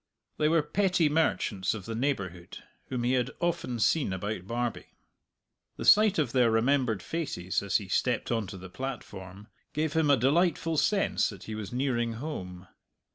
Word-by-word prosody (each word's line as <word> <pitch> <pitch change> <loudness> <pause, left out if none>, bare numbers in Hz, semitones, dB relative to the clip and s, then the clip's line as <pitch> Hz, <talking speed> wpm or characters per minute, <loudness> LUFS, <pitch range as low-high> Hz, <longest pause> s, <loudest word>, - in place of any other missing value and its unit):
They 150 0 +3
were 165 -1 +3
petty 180 -1 +2
merchants 115 -11 0
of 100 -4 -8
the 115 - -4
neighbourhood 100 - -3 0.2
whom 125 -2 -3
he 120 - +1
had 125 -1 +1
often 170 -8 -1
seen 130 +1 +2
about 95 0 -4
Barbie. 120 +1 -3 0.8
The - - -5
sight 215 -1 +6
of 145 -7 +1
their 125 -3 +4
remembered 115 -2 +1
faces 140 - -2
as 100 -4 +1
he 100 - -7
stepped 120 +6 0
on 115 -4 0
to 95 - -8
the 95 +1 -9
platform 105 -7 -7 0.3
gave 155 0 -1
him 160 -2 +2
a 140 - +6
delightful 165 +5 +2
sense 195 +6 +2
that 100 -4 -10
he 110 - -6
was 105 -2 -6
nearing 120 -2 0
home. 95 - -6
120 Hz, 170 wpm, -29 LUFS, 105-150 Hz, 0.8 s, sight